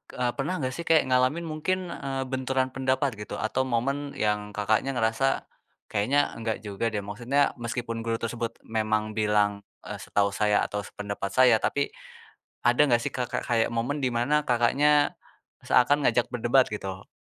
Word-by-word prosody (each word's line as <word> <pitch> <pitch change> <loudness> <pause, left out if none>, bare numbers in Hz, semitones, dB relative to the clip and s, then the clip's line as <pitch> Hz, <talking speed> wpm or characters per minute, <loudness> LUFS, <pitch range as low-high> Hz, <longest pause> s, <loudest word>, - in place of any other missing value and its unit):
e 125 - -2
pernah 150 +7 -1
enggak 130 -1 -1
sih 170 - -6
kayak 160 -1 +5
ngalamin 130 +6 +2
mungkin, 170 +3 -2
eee, 135 -1 -3
benturan 130 0 0
pendapat 130 -2 0
gitu 105 - -6
atau 130 +4 -1
momen 140 +4 -1
yang 105 -3 -1
Kakaknya 110 +6 +1
ngerasa, 115 +3 +1 0.5
"Kayaknya 110 +8 +2 0.2
enggak 115 -1 -2
juga 105 +2 -2
deh," 105 -2 -2
maksudnya 120 +8 0
meskipun 115 0 -3
guru 115 0 0
tersebut 115 0 -3
memang 110 -1 -1
bilang, 105 -1 +3 0.3
e - - -7
"Setahu 100 0 0
saya 105 +1 +2
atau 105 - -3
sependapat 100 -1 -5
saya." 130 -3 +6
Tapi, 140 0 -1 0.7
ada 120 +2 +3
nggak 120 -2 +3
sih, 140 - -2
Kakak, 125 -2 -3
kayak 115 -2 +2
momen 120 +6 -1
dimana 130 +4 +1
Kakaknya 145 +5 +3 0.5
seakan 140 +3 +3
ngajak 120 - +3
berdebat 120 +2 +3
gitu? 95 -2 -5
120 Hz, 155 wpm, -27 LUFS, 110-135 Hz, 0.7 s, saya